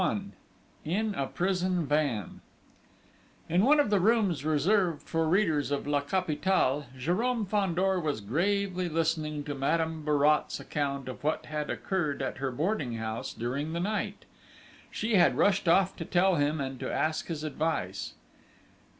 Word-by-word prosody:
XXI 200 +2 -1 0.5
IN 210 +7 -1
A 135 -7 -2
PRISON 180 -1 0
VAN 140 - -1 1.1
In 175 +3 +2
one 295 +5 +5
of 285 -8 +2
the 205 - +4
rooms 200 - +2
reserved 165 +2 +2
for 165 -1 0
readers 165 -6 +2
of 145 -1 -2
La 145 0 +1
Capitale, 150 -3 0
Jérôme 210 - 0
Fandor 190 -1 +1
was 150 -7 -1
gravely 180 - 0
listening 155 -2 -1
to 145 0 -4
Madame 160 +3 -1
Bourrat's 150 0 +2
account 140 -2 -3
of 130 - -7
what 155 +1 -1
had 150 -1 -4
occurred 155 -8 -2
at 135 - -4
her 135 0 -1
boarding 145 - -1
house 110 0 -4
during 140 +7 -3
the 170 - -2
night. 210 +4 -2 0.6
She 220 -1 0
had 175 - +4
rushed 200 -2 +2
off 190 +3 +4
to 165 - -5
tell 185 +3 +3
him 145 +2 +1
and 135 -2 -4
to - - -3
ask 155 0 -1
his 155 -3 -4
advice. 150 - -2
160 Hz, 150 wpm, -29 LUFS, 145-190 Hz, 1.1 s, one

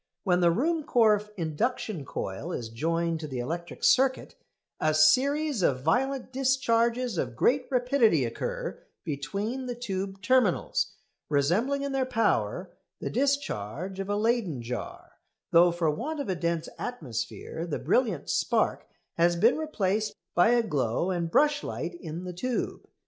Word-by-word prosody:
When 180 -3 +2
the 175 -1 +5
Ruhmkorff 230 - +2
induction 170 - -2
coil 95 - -5
is 115 -8 -4
joined 165 +7 -1
to 155 - -5
the 130 -3 -5
electric 170 +8 -5
circuit 260 0 +3 0.5
a 155 0 +2
series 270 - +3
of 130 -6 +1
violent 260 - 0
discharges 245 -4 +1
of 125 -3 -2
great 255 - +2
rapidity 245 - +3
occur 115 - -4 0.2
between 200 - -3
the 245 - -3
tube 195 -4 -4
terminals, 250 -5 +2 0.4
resembling 195 - +1
in 280 - -2
their 265 -1 0
power 185 - 0 0.3
the - - -4
discharge 195 - -1
of 195 0 -4
a 205 - +1
Leyden 210 - 0
jar, 125 +1 -7 0.3
though 170 +1 +6
for 170 -2 +1
want 290 - -4
of 280 - -3
a 185 - +1
dense 170 -1 -1
atmosphere 160 - -5
the 155 - -2
brilliant 225 - 0
spark - - 0 0.3
has 170 +1 +4
been 220 +8 +4
replaced 215 -9 -1 0.2
by 175 +5 +5
a 240 0 +4
glow 145 - 0
and 170 -2 -1
brush 295 - +3
light 175 - -4
in 165 +1 -6
the 180 -1 -6
tube. 240 +8 -3
195 Hz, 145 wpm, -28 LUFS, 160-250 Hz, 0.5 s, though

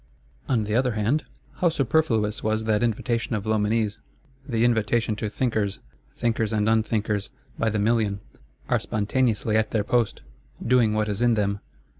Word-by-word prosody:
On 115 -4 +2
the 105 0 -3
other 125 +1 +2
hand, 110 +8 0 0.3
how 175 - +3
superfluous 130 -8 +1
was 110 0 0
that 110 -1 +1
invitation 115 0 -1
of 105 - -3
Loménie's: 110 0 0 0.5
the 115 -1 +2
invitation 115 -1 +1
to 110 -1 -2
thinkers! 110 -4 -1 0.4
Thinkers 115 -2 0
and 105 -1 +1
unthinkers, 110 -2 0 0.3
by 115 - +2
the 110 - -1
million, 105 -1 +1 0.5
are - - +2
spontaneously 110 0 0
at 110 0 +2
their 110 -2 0
post, 120 0 0 0.4
doing 115 -3 +3
what 110 0 +1
is 105 +1 -3
in 120 -1 +4
them. 100 -1 0
110 Hz, 155 wpm, -25 LUFS, 105-120 Hz, 0.5 s, in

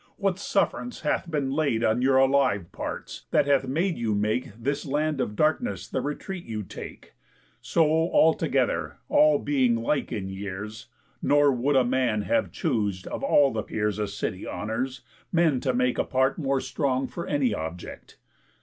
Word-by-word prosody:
What 195 -2 0
suff'rance 205 +5 -1
hath 160 +3 -1
been 145 -4 -1
laid 140 -6 +1
On 110 +2 +2
your 130 +1 +4
alive 130 -9 +2
parts - - -6
that - - +3
hath 140 -2 +2
made 165 +5 0
you 110 -3 0
make 105 +4 -1
This 140 +5 -2
land 150 0 -1
of 105 - -3
darkness 155 - 0
the 130 - -2
retreat 170 +6 -5
you 110 -2 -5
take, - - -10 0.5
So 165 - +2
all 160 +1 +4
together, - - -1
all 150 -1 +5
being 130 -5 +2
like 115 +5 -1
in 95 -2 -3
years, 100 +3 -6 0.3
Nor 145 0 +4
would 135 +3 +1
a 130 -2 +4
man 120 -4 +1
have 285 -1 0
choos'd, 105 - -1
of - - -5
all 145 - +4
the 110 - -1
peers 105 -1 -2
A 105 - 0
city - - -4
honours, 125 +5 -3 0.3
men 165 -6 +3
to 130 - 0
make 125 0 +1
a - - +3
part 130 +2 +1
More 135 -3 0
strong 135 -3 -1
for 170 - -6
any 135 -6 +1
object? 80 -1 -7
135 Hz, 170 wpm, -26 LUFS, 110-150 Hz, 0.5 s, all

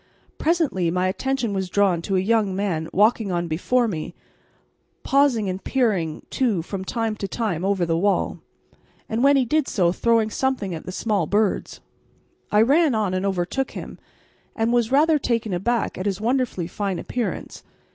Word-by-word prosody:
Presently 310 - +1
my 180 +2 0
attention 235 +3 -1
was 190 -2 -2
drawn 190 -3 +2
to 195 +3 -2
a - - +3
young 205 -1 +1
man 175 -5 -2
walking 210 0 +2
on 175 -1 -1
before 235 +10 +1
me, 160 -7 -5 0.9
pausing 270 -6 +2
and 185 +1 -4
peering 200 - 0
too 225 - 0
from 190 +2 -5
time 225 +2 -2
to 195 - -3
time 195 -6 -2
over 195 -2 +1
the 165 -1 0
wall, 200 +4 0 0.7
and 225 +3 -1
when 280 +1 +6
he 260 - +2
did 305 +3 +1
so 175 -5 +2
throwing 225 +2 +2
something 250 -7 -1
at 160 - -7
the - - -3
small 200 -3 -1
birds. 205 +2 0 0.7
I 210 +1 +5
ran 285 +2 +3
on 210 -4 0
and 185 +1 0
overtook 195 +8 -2
him, - - -8 0.6
and 225 +1 +1
was 240 -1 +2
rather 305 +2 +4
taken 230 -6 -1
aback 225 +6 -1
at 185 - -2
his 195 -1 -1
wonderfully 235 -5 0
fine 195 +1 -3
appearance. 245 +4 -4
210 Hz, 170 wpm, -23 LUFS, 185-240 Hz, 0.9 s, when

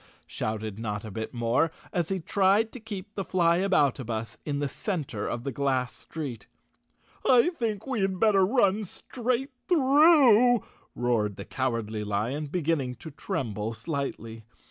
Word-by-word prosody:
shouted 110 -1 -4
Notta 105 -1 -4
Bit 110 +2 -5
More, 120 +7 +1 0.2
as 175 -3 0
he 190 -1 -1
tried 200 +5 +2
to 255 - -8
keep 210 -2 -8
the 195 - -3
Flyaboutabus 160 - +1
in 145 -2 -2
the 145 0 -1
cen 170 - -3
of 110 +3 -3
the 140 - -3
glass 130 -1 0
street. 140 -9 -7 0.8
I 255 +5 +5
think 220 -3 -2
we 260 -6 -1
had 190 -1 0
better 205 -3 +4
run 205 -1 +3
straight 250 +6 -3 0.2
through," 270 - +6 0.3
roared 105 -5 -1
Cowardly 115 -5 -2
Lion, 110 +9 -2
beginning 145 -5 -1
to 160 +6 -9
tremble 110 -5 -3
slightly. 115 -3 -5
150 Hz, 135 wpm, -27 LUFS, -, 0.8 s, through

